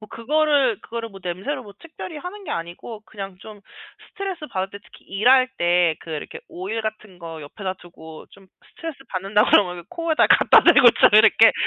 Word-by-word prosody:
뭐 215 - -13
그거를 275 0 +1
그거를 230 0 -6
뭐 195 - -12
냄새로 195 +11 -4
뭐 200 -1 -14
특별히 330 0 -10
하는 385 +5 -9
게 300 - -7
아니고 175 +6 -7
그냥 195 -3 -9
좀 210 -1 -12 0.5
스트레스 380 -6 -6
받을 190 0 -4
때 200 - -10
특히 - - -19
일할 255 +6 +3
때 175 -2 +2
그 165 - -12
이렇게 150 - -7
오일 195 +6 -5
같은 215 -4 -7
거 165 -2 -9
옆에다 185 +6 -6
두고 160 -2 -13
좀 195 -1 -19 0.2
스트레스 325 -4 -8
받는다 200 +3 +1
그러면 180 -3 +2
코에다 330 -2 +1
갖다 - - +6
대고 245 - +7
좀 - - +7
이렇게 220 +1 +6
210 Hz, 370 characters per minute, -22 LUFS, 180-260 Hz, 0.5 s, 대고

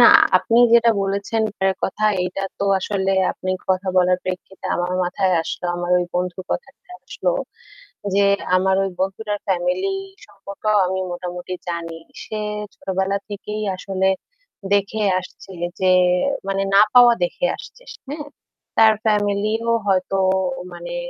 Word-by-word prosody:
না - - +10 0.3
আপনি 230 - +1 0.2
যেটা 235 0 +6
বলেছেন 200 +3 -1
এটার 190 -2 0
কথাটা 215 +2 0 0.2
এইটা 180 +2 -3 0.2
তো - - -1
আসলে 190 0 -1 0.2
আপনি 185 - -4 0.2
কথা 185 0 +1
বলার 180 0 +4
প্রেক্ষিতে 185 +1 -6
আমার 175 +1 -1
মাথায় 185 +1 0
আসলো, 170 - -6
আমার 175 0 -3
ওই 180 - 0
বন্ধুর 180 +1 -2
কথাটা 480 - -6 0.2
আসলো। - - -1 0.8
যে 200 - +4 0.3
আমার 190 +1 +2
ওই 195 - -1
বন্ধুটার 205 +2 -2
ফ্যামিলি 270 - 0 0.3
সম্পর্কেও 200 +2 -3
আমি 190 +1 -2
মোটামুটি 180 0 -5
জানি। 165 -1 -4 0.3
সে 215 - -5 0.4
ছোটবেলা 190 +1 -1
থেকেই 210 +1 -5
আসলে 190 0 -1 0.6
দেখে 205 +2 +1 0.2
আসছে 185 +1 -11 0.3
যে 185 -1 +3 0.6
মানে 195 0 0
না 200 - +8
পাওয়া 245 -1 +8
দেখে 175 - -3
আসছে - - -13
সে - - -15
হ্যাঁ? 295 +1 -5 0.5
তার 220 -1 +7
ফ্যামিলিও 210 +2 +1 0.2
হয়তো 195 0 +1 0.6
মানে - - -7
195 Hz, 135 wpm, -21 LUFS, 185-215 Hz, 0.8 s, না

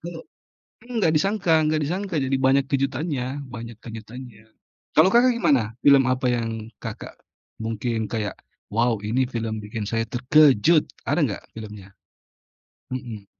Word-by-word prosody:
Kok 170 -1 -7 0.7
enggak 225 -9 +1
disangka 190 +2 +1
enggak 155 0 +1
disangka, 185 +4 -3
jadi 135 0 0
banyak 135 +1 +3
kejutannya 135 0 -1 0.2
banyak 115 -2 -8
kejutannya. 115 0 -10 0.5
Kalau 160 +5 +6
Kakak 245 +1 +5
gimana? 120 - +1
Film 140 -2 +6
apa 130 0 0
yang 115 -2 -3
Kakak - - -8 0.4
mungkin 110 0 -2
kayak, 110 -2 -4 0.3
"wow, 115 0 +1
ini 125 +5 0
film 115 -3 -3
bikin 105 +1 -6
saya 115 0 0
terkejut" 145 +4 +4 0.2
ada - - +2
enggak - - -5 0.2
filmnya? 105 -3 -9 1.0
Mhm. 115 -5 -6
125 Hz, 130 wpm, -24 LUFS, 110-150 Hz, 1.0 s, Kalau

